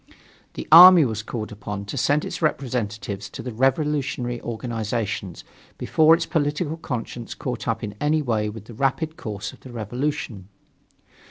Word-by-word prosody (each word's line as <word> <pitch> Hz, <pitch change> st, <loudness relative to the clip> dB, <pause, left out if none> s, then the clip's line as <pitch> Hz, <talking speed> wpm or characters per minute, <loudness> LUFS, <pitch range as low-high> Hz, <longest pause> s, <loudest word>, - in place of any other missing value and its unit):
The -, -, -6 dB
army 175 Hz, -1 st, +10 dB
was 110 Hz, -3 st, -2 dB
called 110 Hz, 0 st, -6 dB
upon 105 Hz, -1 st, -6 dB
to 100 Hz, -, -6 dB
send 145 Hz, +1 st, +1 dB
its -, -, -6 dB
representatives 110 Hz, -9 st, -2 dB
to 130 Hz, -, -8 dB
the 125 Hz, -, -5 dB
revolutionary 135 Hz, -1 st, 0 dB
organizations 110 Hz, -5 st, -4 dB, 0.3 s
before 160 Hz, +1 st, +4 dB
its 165 Hz, 0 st, -3 dB
political 155 Hz, 0 st, -1 dB
conscience 120 Hz, -5 st, -5 dB
caught -, -, -5 dB
up -, -, -1 dB
in 105 Hz, -, -4 dB
any 150 Hz, +1 st, +2 dB
way 110 Hz, -5 st, 0 dB
with 105 Hz, -1 st, -9 dB
the 120 Hz, -, -11 dB
rapid 140 Hz, +6 st, -1 dB
course 105 Hz, -5 st, -6 dB
of -, -, -16 dB
the 130 Hz, -, -12 dB
revolution. 120 Hz, -3 st, -4 dB
120 Hz, 155 wpm, -23 LUFS, 110-150 Hz, 0.3 s, army